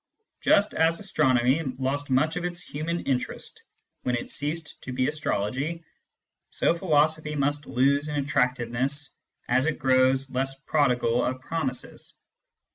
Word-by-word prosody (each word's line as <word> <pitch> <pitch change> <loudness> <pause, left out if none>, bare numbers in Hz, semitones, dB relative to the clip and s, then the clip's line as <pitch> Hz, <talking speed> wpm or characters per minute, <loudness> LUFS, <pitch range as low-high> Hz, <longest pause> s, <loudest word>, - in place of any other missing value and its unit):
Just 205 +1 +4
as 165 +1 +2
astronomy 130 -7 +2 0.2
lost 135 +2 -2
much 150 +5 +2
of 180 - -3
its 175 -1 -3
human 165 +4 -3
interest 130 -2 -3 0.4
when 125 - 0
it 120 - -4
ceased 150 +2 -4
to 130 - -7
be 130 0 +1
astrology, 150 +2 -2 0.7
so - - +2
philosophy 155 -3 +1
must 145 +1 -1
lose 140 +4 +2
in 150 - -3
attractiveness 130 0 0 0.4
as 130 +4 +2
it 160 - 0
grows 130 +1 +3
less 135 +1 -2
prodigal 125 -6 +2
of 130 0 -1
promises. 130 -2 -4
140 Hz, 130 wpm, -26 LUFS, 130-155 Hz, 0.7 s, Just